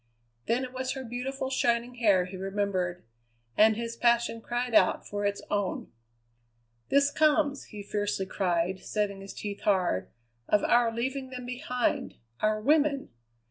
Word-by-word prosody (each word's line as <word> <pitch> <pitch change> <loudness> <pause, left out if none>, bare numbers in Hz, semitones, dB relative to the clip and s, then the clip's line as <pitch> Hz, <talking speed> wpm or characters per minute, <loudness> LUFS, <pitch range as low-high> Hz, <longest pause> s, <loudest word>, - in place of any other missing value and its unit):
Then 245 +3 +1
it 255 0 -6
was 260 0 -2
her 265 -1 -6
beautiful 260 +3 -4
shining 240 -1 +1
hair 205 -7 +3
he 185 +1 -9
remembered, 190 -2 -2 0.5
and 220 0 +6
his 230 +1 -4
passion 235 -1 +2
cried 240 +1 -2
out - - +4
for 205 0 -1
its 200 0 -3
own. 205 -2 -1 1.0
"This 280 +1 +4
comes," 295 -2 +2
he 210 -1 -9
fiercely 205 -1 -1
cried, 180 -1 0
setting 200 -2 -2
his 195 - -8
teeth 205 -1 -5
hard, 180 - +1 0.4
"of 210 - +3
our 240 -1 +4
leaving 260 +3 -3
them 250 -1 -7
behind 250 +1 -2 0.2
our 215 0 +1
women! 285 +3 +2
230 Hz, 145 wpm, -29 LUFS, 200-255 Hz, 1.0 s, and